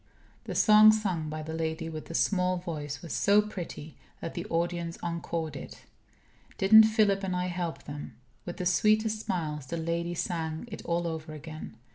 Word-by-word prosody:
The -, -, -5 dB
song 215 Hz, 0 st, +8 dB
sung 185 Hz, -8 st, -1 dB
by 155 Hz, 0 st, -5 dB
the 160 Hz, +1 st, -6 dB
lady 160 Hz, 0 st, -2 dB
with 155 Hz, -1 st, -7 dB
the 165 Hz, -, -6 dB
small 185 Hz, -1 st, +2 dB
voice 150 Hz, -5 st, -5 dB
was 170 Hz, -, -5 dB
so 200 Hz, +1 st, +4 dB
pretty 180 Hz, -7 st, -5 dB, 0.2 s
that 165 Hz, -, -5 dB
the 175 Hz, +4 st, -5 dB
audience 170 Hz, -1 st, -2 dB
encored 165 Hz, -2 st, -3 dB
it. -, -, -9 dB, 0.7 s
Didn't 220 Hz, +3 st, +8 dB
Philip 215 Hz, -3 st, +3 dB
and 185 Hz, -1 st, -1 dB
I 180 Hz, 0 st, 0 dB
help 175 Hz, -2 st, -4 dB
them! 145 Hz, 0 st, -8 dB, 0.3 s
With 175 Hz, -, -7 dB
the 180 Hz, -, -3 dB
sweetest 215 Hz, +4 st, +3 dB
smiles 150 Hz, -6 st, -3 dB
the 170 Hz, -, -3 dB
lady 170 Hz, +1 st, -2 dB
sang 165 Hz, +2 st, -3 dB
it 215 Hz, -, -7 dB
all 170 Hz, 0 st, 0 dB
over 160 Hz, -1 st, -4 dB
again. 155 Hz, -6 st, -9 dB
170 Hz, 175 wpm, -29 LUFS, 160-190 Hz, 0.7 s, song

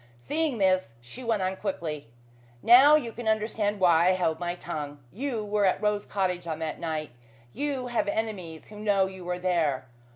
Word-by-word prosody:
Seeing 295 Hz, -, -1 dB
this, 185 Hz, -, +2 dB
she 120 Hz, -, -10 dB
went 225 Hz, -5 st, 0 dB
on 185 Hz, +1 st, -1 dB
quickly. 165 Hz, -, -4 dB, 0.6 s
"Now 265 Hz, +6 st, +8 dB
you 245 Hz, -7 st, 0 dB
can 235 Hz, 0 st, -7 dB
understand 215 Hz, -1 st, 0 dB
why 170 Hz, -2 st, +5 dB
I -, -, +6 dB
held 165 Hz, -3 st, 0 dB
my 175 Hz, 0 st, -2 dB
tongue. 150 Hz, -5 st, -6 dB, 0.2 s
You 235 Hz, -1 st, -3 dB
were 205 Hz, 0 st, +1 dB
at 185 Hz, -, +2 dB
Rose 210 Hz, -1 st, 0 dB
Cottage 180 Hz, -3 st, -1 dB
on 160 Hz, -2 st, -3 dB
that 160 Hz, -1 st, -4 dB
night. 155 Hz, -2 st, -3 dB, 0.4 s
You 280 Hz, -3 st, -2 dB
have 240 Hz, -4 st, -1 dB
enemies 200 Hz, -7 st, -4 dB
who 210 Hz, 0 st, -11 dB
know 205 Hz, -2 st, +2 dB
you 190 Hz, -1 st, -8 dB
were 180 Hz, 0 st, -3 dB
there. 170 Hz, -8 st, 0 dB
190 Hz, 185 wpm, -27 LUFS, 170-220 Hz, 0.6 s, Now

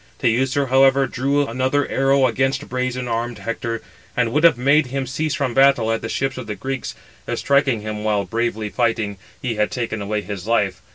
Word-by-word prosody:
Teucer, 130 Hz, +3 st, +1 dB
however, 135 Hz, +1 st, +5 dB
drew 140 Hz, +3 st, 0 dB
another 130 Hz, +4 st, 0 dB
arrow 135 Hz, 0 st, +3 dB
against 135 Hz, +2 st, 0 dB
brazen 125 Hz, 0 st, -2 dB
armed 120 Hz, +1 st, -2 dB
Hector, 115 Hz, 0 st, -4 dB, 0.3 s
and 120 Hz, -2 st, +2 dB
would 150 Hz, +3 st, +2 dB
have 165 Hz, -6 st, +6 dB
made 140 Hz, +3 st, +3 dB
him 135 Hz, +1 st, -3 dB
cease 155 Hz, +4 st, -2 dB
from 135 Hz, -5 st, -1 dB
battle, 135 Hz, -4 st, +4 dB
at 115 Hz, -, -1 dB
the 115 Hz, -, -5 dB
ships 135 Hz, -1 st, -2 dB
of 120 Hz, -, -7 dB
the 105 Hz, -, -4 dB
Greeks, 135 Hz, +2 st, -4 dB, 0.3 s
if -, -, -2 dB
striking 140 Hz, -5 st, +2 dB
him 105 Hz, 0 st, -5 dB
while 105 Hz, -2 st, +1 dB
bravely 115 Hz, -2 st, -2 dB
fighting, 115 Hz, -4 st, 0 dB, 0.2 s
he 120 Hz, -5 st, -3 dB
had 105 Hz, 0 st, +1 dB
taken 115 Hz, -4 st, -3 dB
away 105 Hz, +1 st, -2 dB
his 100 Hz, 0 st, -6 dB
life. 105 Hz, -5 st, +1 dB
125 Hz, 190 wpm, -21 LUFS, 115-135 Hz, 0.3 s, have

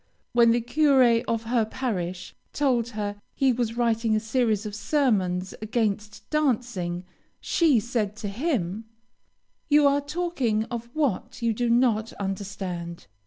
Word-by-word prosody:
When 235 Hz, -1 st, +6 dB
the 235 Hz, +1 st, +3 dB
curé 250 Hz, -3 st, +4 dB
of 230 Hz, -1 st, -1 dB
her 230 Hz, 0 st, +1 dB
parish 185 Hz, -6 st, -4 dB, 0.2 s
told 255 Hz, -5 st, +1 dB
her 205 Hz, -1 st, -3 dB
he 265 Hz, -2 st, +3 dB
was 235 Hz, -1 st, -2 dB
writing 230 Hz, -2 st, +2 dB
a -, -, +2 dB
series 220 Hz, -2 st, 0 dB
of 210 Hz, -, -5 dB
sermons 205 Hz, -7 st, 0 dB
against 215 Hz, -2 st, -2 dB
dancing, 235 Hz, -, -1 dB, 0.3 s
she 310 Hz, -8 st, +3 dB
said 215 Hz, -2 st, -2 dB
to 210 Hz, -, -5 dB
him: 220 Hz, -, -2 dB, 0.8 s
"You 295 Hz, 0 st, +5 dB
are 280 Hz, +1 st, +3 dB
talking 285 Hz, -8 st, -1 dB
of 235 Hz, 0 st, -5 dB
what 255 Hz, -4 st, -1 dB
you 230 Hz, -1 st, +2 dB
do 240 Hz, +2 st, -1 dB
not 230 Hz, -2 st, +2 dB
understand. 190 Hz, -, -5 dB
230 Hz, 135 wpm, -26 LUFS, 205-255 Hz, 0.8 s, When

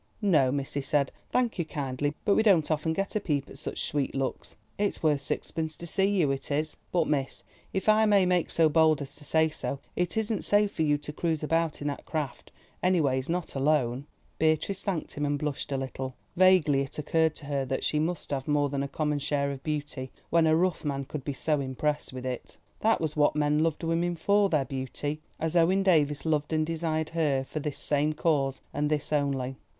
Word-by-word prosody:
"No, 150 Hz, -10 st, +4 dB
miss," 140 Hz, 0 st, -3 dB
he 140 Hz, -, -1 dB
said, 140 Hz, 0 st, +1 dB, 0.2 s
"thanking 235 Hz, -8 st, +1 dB
you -, -, -12 dB
kindly—but 145 Hz, +6 st, -1 dB
we -, -, +4 dB
don't 185 Hz, -8 st, +4 dB
often 155 Hz, +1 st, 0 dB
get 195 Hz, +6 st, -2 dB
a -, -, +3 dB
peep 145 Hz, -8 st, -1 dB
at -, -, -7 dB
such -, -, -4 dB
sweet 145 Hz, -2 st, -1 dB
looks. 135 Hz, -1 st, -3 dB, 0.2 s
It's 205 Hz, -4 st, -1 dB
worth 150 Hz, -3 st, +3 dB
sixpence 160 Hz, +2 st, -3 dB
to 170 Hz, -, -9 dB
see 190 Hz, +3 st, +2 dB
you, 185 Hz, -8 st, +2 dB
it 135 Hz, -, -4 dB
is. 155 Hz, +2 st, -1 dB, 0.2 s
But, 170 Hz, -3 st, +2 dB
miss, 140 Hz, -3 st, -1 dB, 0.3 s
if 190 Hz, -, -3 dB
I 215 Hz, 0 st, +5 dB
may 200 Hz, -3 st, +5 dB
make 180 Hz, -2 st, +1 dB
so 165 Hz, -1 st, +4 dB
bold 155 Hz, -1 st, +4 dB
as 135 Hz, -, -8 dB
to 150 Hz, -, -10 dB
say 160 Hz, +2 st, +3 dB
so, 140 Hz, -2 st, -4 dB, 0.2 s
it 180 Hz, +4 st, -1 dB
isn't 220 Hz, -1 st, 0 dB
safe 205 Hz, 0 st, +3 dB
for -, -, -4 dB
you 150 Hz, -2 st, +3 dB
to 150 Hz, +1 st, -8 dB
cruise 160 Hz, -1 st, -1 dB
about 165 Hz, 0 st, 0 dB
in -, -, -2 dB
that 140 Hz, -, -6 dB
craft, 150 Hz, -5 st, -4 dB, 0.3 s
any 185 Hz, -1 st, +3 dB
ways 130 Hz, -2 st, 0 dB
not 175 Hz, 0 st, -2 dB
alone." 135 Hz, -2 st, +1 dB, 0.3 s
Beatrice 160 Hz, +5 st, +1 dB
thanked 185 Hz, -6 st, -2 dB
him 145 Hz, -, -3 dB
and 145 Hz, 0 st, +1 dB
blushed 145 Hz, -1 st, -3 dB
a 135 Hz, -, 0 dB
little. 130 Hz, -1 st, -5 dB, 0.2 s
Vaguely 180 Hz, -7 st, +5 dB
it 140 Hz, -, -5 dB
occurred 160 Hz, +1 st, +1 dB
to 145 Hz, -, -10 dB
her 140 Hz, -1 st, -1 dB
that 130 Hz, 0 st, -2 dB
she 150 Hz, -, +1 dB
must 165 Hz, +1 st, -2 dB
have 135 Hz, -2 st, -2 dB
more 145 Hz, -1 st, +2 dB
than 140 Hz, 0 st, -2 dB
a 140 Hz, -, -1 dB
common 150 Hz, +1 st, -1 dB
share 140 Hz, -1 st, 0 dB
of 135 Hz, -1 st, -7 dB
beauty, 145 Hz, -3 st, -4 dB, 0.2 s
when 165 Hz, -1 st, +4 dB
a 155 Hz, -, +5 dB
rough 180 Hz, +2 st, +1 dB
man 140 Hz, -2 st, -2 dB
could 140 Hz, 0 st, -6 dB
be 145 Hz, -, -3 dB
so 150 Hz, +2 st, 0 dB
impressed 145 Hz, +3 st, -2 dB
with 130 Hz, 0 st, -7 dB
it. 125 Hz, -2 st, -5 dB, 0.2 s
That 225 Hz, +1 st, +3 dB
was 155 Hz, -2 st, -2 dB
what 150 Hz, -1 st, +3 dB
men 150 Hz, 0 st, +2 dB
loved 160 Hz, 0 st, 0 dB
women 170 Hz, +1 st, 0 dB
for, 200 Hz, +4 st, +3 dB
their 150 Hz, -5 st, +1 dB
beauty, 135 Hz, +3 st, -4 dB, 0.2 s
as 160 Hz, +1 st, -1 dB
Owen 180 Hz, +3 st, +4 dB
Davies 150 Hz, -6 st, +2 dB
loved 155 Hz, -1 st, 0 dB
and 155 Hz, 0 st, +2 dB
desired 160 Hz, -1 st, -1 dB
her 145 Hz, -5 st, +1 dB
for 155 Hz, -, -4 dB
this 150 Hz, -1 st, -4 dB
same 150 Hz, +1 st, +1 dB
cause 140 Hz, -4 st, 0 dB
and 145 Hz, 0 st, 0 dB
this 150 Hz, 0 st, -1 dB
only. 135 Hz, -3 st, 0 dB
150 Hz, 220 wpm, -28 LUFS, 140-165 Hz, 0.3 s, I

